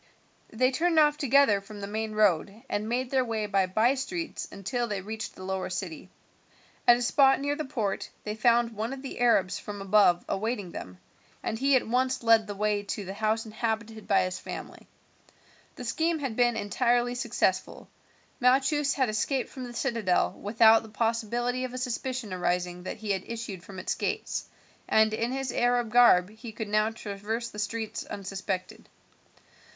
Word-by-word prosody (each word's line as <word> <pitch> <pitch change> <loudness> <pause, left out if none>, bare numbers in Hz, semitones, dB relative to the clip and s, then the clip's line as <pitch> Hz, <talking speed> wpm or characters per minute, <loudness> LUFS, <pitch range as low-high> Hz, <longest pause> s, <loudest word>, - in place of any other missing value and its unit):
They 255 +4 +2
turned 330 +4 +1
off 300 -1 +5
together 275 -7 +4
from 205 +1 -11
the 200 - -4
main 215 +1 -3
road 205 +1 +1
and 210 +2 -2
made 250 +1 -1
their 265 -1 +3
way 225 -3 -2
by 195 -2 +1
bystreets 270 - -1
until 235 +5 -2
they 205 -3 -2
reached 220 +3 -6
the 185 - -10
lower 190 -1 -3
city. 180 -1 -5 0.8
At 240 - +8
a 245 - -2
spot 270 +2 +4
near 285 +1 -1
the 310 - -4
port 225 -8 -2
they 210 - -3
found 235 +1 +3
one 225 +3 -3
of 270 0 -8
the 270 - -7
Arabs 230 -7 +3
from 205 -1 -7
above 195 -3 +4
awaiting 205 -3 -2
them, 90 - -8 0.5
and 225 - -2
he 275 +1 +4
at 255 - +2
once 255 +2 0
led 225 -1 +5
the 205 - -5
way 210 0 0
to 205 0 -5
the 190 - -5
house 220 +2 0
inhabited 220 0 -3
by 200 -2 +4
his 185 0 -3
family. - - -8 0.9
The - - -8
scheme 325 +7 0
had 270 -7 -4
been 240 -1 +3
entirely 240 +4 +1
successful. 245 - -1 0.5
Malchus 275 +3 +3
had 260 -3 +2
escaped 240 +4 -1
from 260 -2 -7
the 245 - -8
citadel 230 -8 +1
without 225 +2 +4
the 220 - -12
possibility 235 +3 -1
of 255 0 -5
a - - -4
suspicion 255 -3 -3
arising 180 0 -1
that 180 - -6
he 210 -1 -3
had 190 -2 0
issued 225 -5 -5
from 195 - -11
its 185 - -2
gates, - - -3 0.4
and 220 0 +4
in 230 +2 -1
his 265 -1 -2
Arab 245 -2 +1
garb 210 -6 +6
he 220 +1 -9
could 220 -1 -6
now 215 +1 +2
traverse 225 +1 -4
the 210 - -9
streets 220 +1 -3
unsuspected. 190 -1 -5
225 Hz, 175 wpm, -28 LUFS, 205-245 Hz, 0.9 s, At